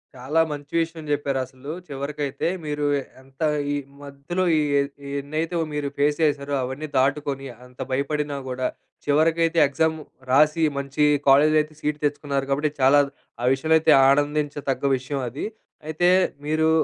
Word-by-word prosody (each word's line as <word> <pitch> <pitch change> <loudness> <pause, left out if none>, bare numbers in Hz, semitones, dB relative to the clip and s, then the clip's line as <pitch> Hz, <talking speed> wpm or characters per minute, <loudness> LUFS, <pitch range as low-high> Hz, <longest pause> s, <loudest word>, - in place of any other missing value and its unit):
చాలా 130 +6 -1
మంచి 145 0 -7
విషయం 165 -1 -5
చెప్పారు. 140 -2 0
అసలు 130 +3 -9 0.2
చివరికైతే 140 0 -3 0.2
మీరు 150 0 -2
ఏ - - -4 0.2
ఎంత 135 +3 -20 0.3
ఈ - - 0 0.3
మధ్యలో 145 +6 -4
ఈ - - +3 0.5
ఈ - - -6
ఎన్నైతే 155 +5 -3 0.2
మీరు 150 -1 -2
ఫేస్ 145 +1 +2
చేసారో 145 -2 0
అవన్నీ 130 +5 -5
దాటుకొని 135 0 0 0.2
అంత 125 0 -20
భయపడినా 145 +2 -1
కూడా, 130 0 -1 0.4
చివరికైతే 165 +3 +2
ఎగ్జామ్ 160 +3 0 0.3
రాసి, 150 +4 +4
మంచి 140 +2 0 0.2
కాలేజీలో 150 +3 +6
అయితే 155 +1 -8
సీట్ 150 0 -2
తెచ్చుకున్నారు. 145 -2 -1
కాబట్టి, 145 +2 +1
చాలా 135 +2 +6 0.4
ఆ - - +1
విషయంలో 155 +4 +3
అయితే 155 -1 +5 0.2
ఆనందించతగ్గ 145 -1 0
విషయం 135 +2 -4
అది. 130 +5 -5 0.4
అయితే 165 +3 +2 0.4
మీరు 160 +1 +2
145 Hz, 145 wpm, -23 LUFS, 140-155 Hz, 0.5 s, కాలేజీలో